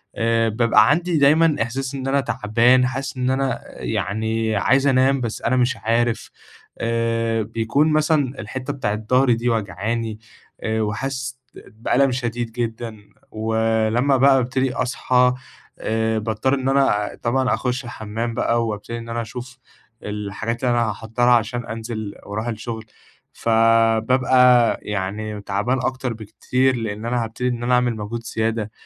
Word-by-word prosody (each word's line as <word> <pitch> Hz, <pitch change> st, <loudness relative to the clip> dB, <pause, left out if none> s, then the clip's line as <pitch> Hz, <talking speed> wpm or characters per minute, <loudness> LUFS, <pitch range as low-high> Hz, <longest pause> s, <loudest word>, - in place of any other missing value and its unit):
آآ، 115 Hz, 0 st, +1 dB
بابقى 110 Hz, 0 st, +4 dB
عندي 170 Hz, +3 st, +1 dB
دايمًا 155 Hz, +2 st, +4 dB
إحساس 130 Hz, +4 st, -3 dB
إن 135 Hz, -1 st, -4 dB
أنا 140 Hz, +1 st, +2 dB
تعبان، 125 Hz, +1 st, +3 dB
حاسس 135 Hz, +2 st, -4 dB
إن 125 Hz, 0 st, 0 dB
أنا 130 Hz, -1 st, 0 dB, 0.2 s
يعني 110 Hz, +1 st, -1 dB
عايز 130 Hz, +7 st, +3 dB
أنام، 135 Hz, 0 st, +3 dB
بس 115 Hz, -2 st, -4 dB
أنا 130 Hz, -, +1 dB
مش 125 Hz, 0 st, +1 dB
عارف 115 Hz, +1 st, 0 dB, 0.5 s
آآ، 115 Hz, -1 st, 0 dB
بيكون 115 Hz, +8 st, +1 dB
مثلًا 150 Hz, -4 st, +1 dB
الحتَّة 130 Hz, +6 st, -5 dB
بتاعة 105 Hz, -7 st, -2 dB
ضهري 125 Hz, +4 st, +2 dB
دي 120 Hz, +2 st, -1 dB
واجعاني، 110 Hz, +1 st, -2 dB, 0.4 s
آآ 110 Hz, 0 st, 0 dB
وحاسِس 130 Hz, +4 st, -3 dB, 0.2 s
بألم 125 Hz, +4 st, 0 dB
شديد 120 Hz, -2 st, -3 dB
جدًا، 115 Hz, -1 st, -4 dB, 0.3 s
ولما 110 Hz, +4 st, +1 dB
بقى 135 Hz, +1 st, +5 dB
ابتدي 130 Hz, +1 st, 0 dB
أصحى 125 Hz, 0 st, +2 dB, 0.5 s
آآ، 110 Hz, 0 st, 0 dB
باضطرّ 110 Hz, +4 st, -1 dB
إن 130 Hz, 0 st, -1 dB
أنا 135 Hz, -7 st, +2 dB
طبعًا 130 Hz, +2 st, +1 dB
أخُشّ 125 Hz, 0 st, -2 dB
الحمّام 115 Hz, 0 st, -4 dB
بقى، 115 Hz, +1 st, +1 dB
وابتدي 105 Hz, +2 st, -5 dB
إن 115 Hz, 0 st, -8 dB
أنا 115 Hz, 0 st, -2 dB
أشوف 125 Hz, +2 st, -8 dB, 0.5 s
الحاجات 105 Hz, +3 st, -4 dB
اللي 125 Hz, -, +2 dB
أنا 115 Hz, -2 st, +1 dB
هاحضّرها 115 Hz, +4 st, +1 dB
عشان 120 Hz, +1 st, 0 dB
أنزل 110 Hz, -2 st, -5 dB
واروح 110 Hz, +3 st, -4 dB
الشغل، 110 Hz, -1 st, -5 dB, 0.5 s
فبابقى 115 Hz, +2 st, +4 dB
يعني 105 Hz, +1 st, -4 dB
تعبان 105 Hz, +6 st, -1 dB
أكتر 130 Hz, -1 st, -2 dB
بكتير 125 Hz, +4 st, 0 dB
لإن 110 Hz, -1 st, -4 dB
أنا 120 Hz, 0 st, 0 dB
هابتدي 115 Hz, +3 st, -3 dB
إن 120 Hz, -1 st, -3 dB
أنا 125 Hz, +1 st, +1 dB
أعمل 125 Hz, -1 st, +1 dB
مجهود 110 Hz, +2 st, -5 dB
زيادة، 110 Hz, -2 st, -2 dB
115 Hz, 140 wpm, -21 LUFS, 110-130 Hz, 0.5 s, بقى